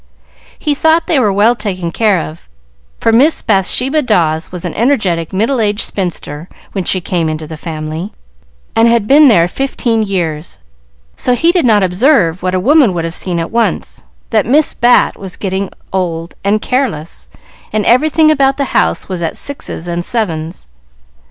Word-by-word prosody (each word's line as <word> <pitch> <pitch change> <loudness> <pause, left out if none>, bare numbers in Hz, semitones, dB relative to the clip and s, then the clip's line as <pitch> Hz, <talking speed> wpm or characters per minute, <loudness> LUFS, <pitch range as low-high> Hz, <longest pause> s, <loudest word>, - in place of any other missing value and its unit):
He 300 - -1
thought 320 +3 +2
they 305 - +2
were 215 -5 +2
well 205 +4 +3
taken 185 -6 -4
care 210 -1 +2
of, 160 +1 -8 0.5
for 225 - +2
Miss 275 +8 +3
Bathsheba 250 +9 +1
Dawes 170 - 0
was 180 -1 -6
an 175 - -4
energetic, 200 - 0
middle 225 +6 0
aged 210 0 0
spinster 170 -4 -4 0.2
when 195 - -3
she 185 - +1
came 170 -2 -1
into 155 0 -4
the 160 +1 -8
family, 155 +4 -6 0.6
and 225 +1 +4
had 235 -2 +2
been 290 +5 +6
there 175 -9 +4
fifteen 235 0 -1
years, 175 -6 -3 0.6
so 250 - +1
he 330 +7 +3
did 350 -5 +1
not 210 -4 +4
observe, 185 - +2
what 185 0 -1
a - - +1
woman 255 - +3
would 170 - -2
have 165 - -4
seen 180 -1 -2
at 165 0 -3
once, 225 - -1 0.3
that - - +2
Miss 295 +5 +3
Bat 245 +1 +3
was 190 -2 -8
getting 190 0 -3 0.2
old 170 -3 -2
and 205 +2 +1
careless, 225 - -3 0.4
and 215 -1 -1
everything 310 +5 +4
about 275 -2 +2
the 280 -2 -3
house - - +1
was 185 -2 -4
at 165 - -3
sixes 275 - -5
and 175 0 -3
sevens. 170 -7 -3
200 Hz, 170 wpm, -14 LUFS, 170-250 Hz, 0.6 s, been